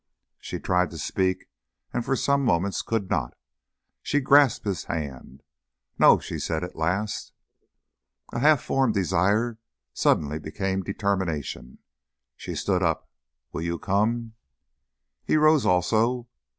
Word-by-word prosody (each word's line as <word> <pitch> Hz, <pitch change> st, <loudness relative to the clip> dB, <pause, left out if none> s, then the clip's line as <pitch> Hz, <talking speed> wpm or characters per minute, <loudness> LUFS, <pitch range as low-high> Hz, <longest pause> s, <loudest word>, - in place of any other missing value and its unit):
She -, -, -5 dB
tried 90 Hz, -1 st, +1 dB
to 85 Hz, -, -9 dB
speak, 95 Hz, +4 st, -1 dB, 0.5 s
and 120 Hz, -, -1 dB
for 135 Hz, -, 0 dB
some 140 Hz, +2 st, +1 dB
moments 95 Hz, -4 st, +1 dB
could 110 Hz, -4 st, -2 dB
not. -, -, -1 dB, 0.6 s
She 145 Hz, -, 0 dB
grasped 140 Hz, -3 st, +4 dB
his 100 Hz, -3 st, -2 dB
hand. 70 Hz, -3 st, -6 dB, 0.6 s
"No," -, -, +7 dB
she -, -, -6 dB
said 80 Hz, 0 st, -2 dB
at 90 Hz, -, -7 dB
last. 95 Hz, +7 st, -2 dB, 1.0 s
A -, -, -2 dB
half 150 Hz, +1 st, +4 dB
formed 130 Hz, -5 st, +1 dB
desire 100 Hz, +5 st, +1 dB, 0.3 s
suddenly 75 Hz, +1 st, +1 dB
became 95 Hz, +5 st, -2 dB
determination. 95 Hz, -, -3 dB, 0.6 s
She -, -, -7 dB
stood 95 Hz, -2 st, 0 dB
up. 80 Hz, -3 st, -1 dB, 0.4 s
"Will -, -, -4 dB
you 85 Hz, 0 st, -2 dB
come?" 110 Hz, +5 st, 0 dB, 0.9 s
He -, -, +2 dB
rose 155 Hz, -2 st, +4 dB
also. 115 Hz, +7 st, +2 dB
95 Hz, 125 wpm, -25 LUFS, 85-120 Hz, 1.0 s, No